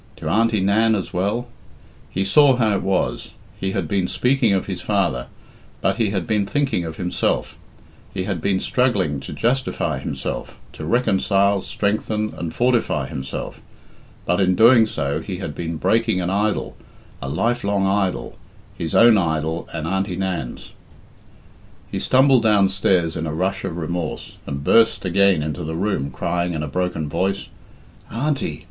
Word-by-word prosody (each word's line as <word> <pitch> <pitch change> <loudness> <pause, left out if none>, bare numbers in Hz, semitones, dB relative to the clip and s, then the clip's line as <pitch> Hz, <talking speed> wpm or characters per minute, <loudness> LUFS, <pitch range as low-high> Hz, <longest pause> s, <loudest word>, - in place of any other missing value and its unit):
To 75 - -6
Auntie 110 +4 +2
Nan 110 +3 +3
as 95 - -4
well? 105 +7 -1 0.6
He 95 +1 -1
saw 135 +6 +5
how 110 -4 +2
it - - -3
was; 95 -1 -1 0.3
he 95 0 -2
had 95 -5 -1
been 95 +1 0
speaking 125 -1 +2
of 95 -1 +1
his 95 -3 -5
father, 85 -12 0 0.5
but 95 +1 0
he 110 -3 +1
had 95 -4 -2
been 105 -3 0
thinking 135 -4 0
of 80 -1 -6
himself; 90 +1 -1 0.6
he 95 - -3
had 90 -4 -3
been 95 +1 +1
struggling 100 - +1
to - - -8
justify 130 +3 -1
himself, - - -5 0.2
to - - -7
reconcile, 100 -4 +2
strengthen, 105 +2 -1
and 85 -2 -4
fortify 120 -1 +1
himself. 65 0 -6 0.6
But 90 +2 +1
in 95 -1 +3
doing 115 +2 +6
so 70 -8 -2
he - - -5
had - - -5
been 85 -1 -4
breaking 110 +4 +1
an 90 0 -1
idol, 105 +2 -1 0.5
a 70 - -4
life 120 - 0
long 100 -1 +1
idol, 95 -1 -1 0.4
his 80 -2 -4
own 115 -2 +7
idol 80 -1 -1
and 80 -2 -4
Auntie 95 +1 -1
Nan's. 95 -10 -4 1.2
He - - -2
stumbled 130 -1 +4
downstairs 95 -5 +2
in 80 0 -3
a 75 - -3
rush 95 +4 -1
of 85 - -4
remorse, 85 0 -4
and 70 0 -4
burst 115 +4 +4
again 95 -2 +3
into 80 +3 -4
the 80 +1 -4
room 90 -6 -1
crying 85 +3 -2
in 75 -1 -3
a - - -3
broken 90 0 -2
voice, 95 +6 -1 0.6
"Auntie! 140 +5 -2
95 Hz, 160 wpm, -21 LUFS, 85-110 Hz, 1.2 s, own